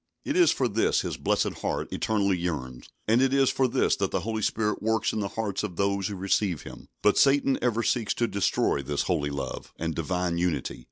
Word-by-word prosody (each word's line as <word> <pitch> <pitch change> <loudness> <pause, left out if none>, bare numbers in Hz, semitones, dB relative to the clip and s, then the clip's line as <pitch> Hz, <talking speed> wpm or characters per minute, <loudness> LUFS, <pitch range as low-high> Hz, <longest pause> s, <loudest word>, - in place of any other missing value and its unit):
It 290 - -1
is 355 -1 +6
for 130 - +1
this 110 0 +1
His - - -3
blessed - - -1
heart - - -3
eternally 100 -3 +1
yearns, 75 -8 -4 0.2
and 115 +3 +4
it 135 0 +3
is 135 -1 +4
for 130 - +2
this 120 - +2
that - - 0
the - - -1
Holy 110 0 -3
Spirit 105 0 0
works 110 0 +1
in 110 - -1
the 100 - -1
hearts 105 -4 -1
of 105 -5 -5
those 100 +1 0
who 100 - -5
receive 95 -2 0
Him. - - -11 0.2
But 105 - +4
Satan 135 -1 +3
ever 115 -1 +1
seeks 115 -3 0
to 120 - +1
destroy 100 -8 +1
this 70 +1 -2
holy 75 -6 0
love 70 -2 -5
and 80 0 -2
divine 85 +1 -1
unity. 85 -6 -1
100 Hz, 215 wpm, -27 LUFS, 85-115 Hz, 0.2 s, is